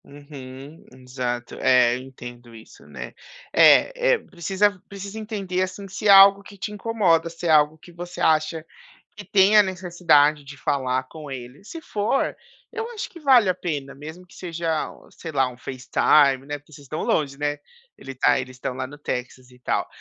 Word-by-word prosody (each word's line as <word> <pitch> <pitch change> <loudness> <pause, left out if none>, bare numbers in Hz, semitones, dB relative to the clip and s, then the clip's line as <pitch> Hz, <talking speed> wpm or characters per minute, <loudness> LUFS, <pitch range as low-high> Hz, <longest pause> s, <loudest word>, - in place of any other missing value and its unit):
Uhum. 140 0 -12
Exato. 125 -2 -5
É, 125 -2 +4
eu 125 - -6
entendo 120 -2 -12
isso, 110 - -15
né. - - -9 0.4
É, - - +5
eh, - - +3
precisa 195 - -1
precisa 200 +2 -8
entender, 200 -4 -3
assim, 185 +1 -4
se 190 +3 -4
é - - +4
algo 195 0 +8
que 200 0 -14
te 195 - -5
incomoda, 195 -6 +1
se 165 +1 -9
é - - +1
algo 150 0 +4
que 175 - -16
você 175 +1 -9
acha 160 +1 +1 0.5
que 205 - -9
tem 200 +1 +4
a 210 - +9
necessidade 170 -6 +2
de 140 0 -11
falar 130 -2 -1
com 150 +2 -11
ele. 130 +6 -9
Se 325 +10 -9
for, 210 +3 -1 0.4
eu 450 +1 -5
acho 445 -1 -5
que 340 - -13
vale 255 -8 +5
a 185 - +2
pena, 145 -6 -5
mesmo 160 +6 -11
que - - -19
seja 165 -3 -3
o - - -18
sei 165 - -9
lá, 135 -3 +2
um 125 - -11
facetime, 135 +2 +2
né, 145 0 -4
porque 145 +2 -25
vocês 145 -1 -13
estão 155 +3 -5
longe, 140 -3 0
né, 145 0 -1 0.4
ele 135 - -9
está 130 - +2
eles 130 -1 -6
estão 125 0 -4
lá 130 0 -4
no 145 +3 -13
Texas 125 -2 -6
e 125 - -19
tal. - - -1
155 Hz, 190 wpm, -23 LUFS, 135-195 Hz, 0.5 s, a